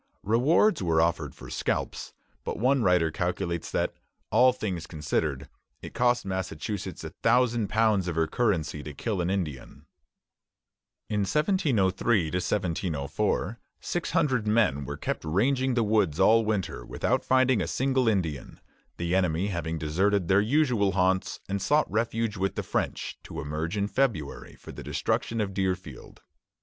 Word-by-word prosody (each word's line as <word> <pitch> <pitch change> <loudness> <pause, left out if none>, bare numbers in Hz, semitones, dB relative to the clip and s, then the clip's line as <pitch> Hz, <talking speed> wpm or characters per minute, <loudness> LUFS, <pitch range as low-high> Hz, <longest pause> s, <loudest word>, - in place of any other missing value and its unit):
Rewards 140 - +3
were 85 -3 +2
offered 85 0 0
for - - -11
scalps; - - -3 0.3
but - - -4
one 130 +4 +2
writer 90 -5 +3
calculates 85 0 -2
that, - - -1 0.4
all 130 0 +6
things 95 -9 -4
considered, 75 -4 -2 0.4
it - - -8
cost 120 -2 +2
Massachusetts 95 0 -4
a - - -6
thousand 120 -4 +2
pounds 110 -4 +2
of 85 - -2
her 80 0 +2
currency 85 -6 0
to 75 -1 -8
kill 100 +2 -2
an 85 - -1
Indian. 85 -9 -4 1.2
In 105 - -1
1703 110 - +1
1704 90 - -1 0.2
six 175 - -3
hundred 135 -10 +1
men 105 - +2
were - - -5
kept - - -3
ranging 125 - +1
the 120 - +2
woods 105 -7 +1
all 110 +4 +5
winter 105 -4 -2
without - - -1
finding 130 -2 +3
a - - -2
single 130 -2 +1
Indian, 85 - -1 0.4
the 85 0 -2
enemy 90 0 +1
having 85 -3 -3
deserted 90 +5 +1
their 95 +3 +4
usual 115 - +2
haunts 95 0 +1
and 100 0 -2
sought 150 +8 +3
refuge 115 -1 -1
with 95 +1 -1
the - - -2
French, - - -3
to - - -8
emerge 80 +5 -3
in 100 0 0
February 105 - -2
for - - -11
the - - -9
destruction 115 - -1
of 100 -2 -1
Deerfield. 90 -8 -4
100 Hz, 150 wpm, -27 LUFS, 85-115 Hz, 1.2 s, all